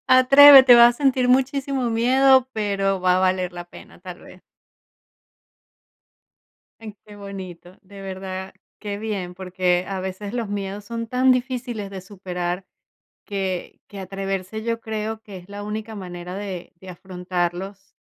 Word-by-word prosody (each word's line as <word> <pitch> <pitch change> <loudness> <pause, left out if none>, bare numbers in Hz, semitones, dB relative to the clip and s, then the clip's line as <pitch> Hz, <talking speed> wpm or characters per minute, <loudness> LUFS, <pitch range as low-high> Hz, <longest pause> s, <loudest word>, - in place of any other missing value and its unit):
Atrévete, 265 0 +9
vas 240 0 +7
a - - -22
sentir 260 -3 +2
muchísimo 265 -1 +1
miedo, 260 +3 +4
pero 195 -3 -1
va 180 0 +3
a 185 - +1
valer 185 -1 0
la 175 0 -8
pena, - - -15
tal 180 -1 -10
vez. 185 - -15 2.4
Ay, 215 -2 -10
qué 210 -1 -13
bonito, 190 -3 -10
de 200 0 -13
verdad. 190 0 -7 0.3
Qué 205 -1 -5
bien, 200 -4 -4
porque 180 -1 -1
a 195 -1 -4
veces 190 +2 -6
los 235 -4 -3
miedos 200 0 -5
son 230 +1 -5
tan 255 +2 +3
difíciles 245 -4 -3
de 195 -1 -8
superar, 180 -1 -5 0.6
que 190 -3 -4
que 200 - -10
atreverse, 195 +2 -5
yo 230 0 -2
creo 220 0 -5
que 205 -3 -11
es 180 +2 -15
la 205 0 -7
única 215 +1 -6
manera 180 -1 -8
de 195 -3 -7
de 190 - -12
afrontarlos, 180 +1 -5
200 Hz, 145 wpm, -22 LUFS, 185-230 Hz, 2.4 s, Atrévete